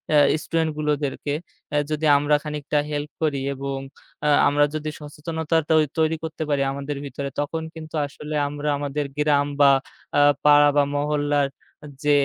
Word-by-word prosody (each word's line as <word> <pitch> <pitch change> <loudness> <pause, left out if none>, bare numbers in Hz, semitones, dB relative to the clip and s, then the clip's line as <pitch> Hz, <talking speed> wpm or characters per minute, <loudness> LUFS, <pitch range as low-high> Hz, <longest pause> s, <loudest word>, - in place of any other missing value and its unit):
আ - - +7 0.3
স্টুডেন্টগুলোদেরকে 150 -3 -1 0.6
যদি 155 +1 -1
আমরা 145 +1 +2
খানিকটা 150 -1 -1
হেল্প 145 0 -3
করি 145 -3 +1 0.2
এবং 135 0 -4 0.5
আ - - +3 0.2
আমরা 145 +1 +4
যদি 155 0 -3
সচেতনতা 160 +2 -2 0.4
তৈরি 160 0 +2
করতে 160 0 -4
পারি 140 -1 +1
আমাদের 140 +1 -4
ভিতরে 140 0 -5
তখন 160 +3 -2
কিন্তু 160 0 -8
আসলে 150 +1 -7
আমরা 145 +1 -5
আমাদের 145 0 -2
গ্রাম 145 -1 +3
বা 140 - +8 0.5
আ - - +6 0.2
পাড়া 145 0 +7
বা 145 - +5
মহল্লার 145 -1 +1 0.6
যে 150 - +3
145 Hz, 140 wpm, -23 LUFS, 145-155 Hz, 0.6 s, বা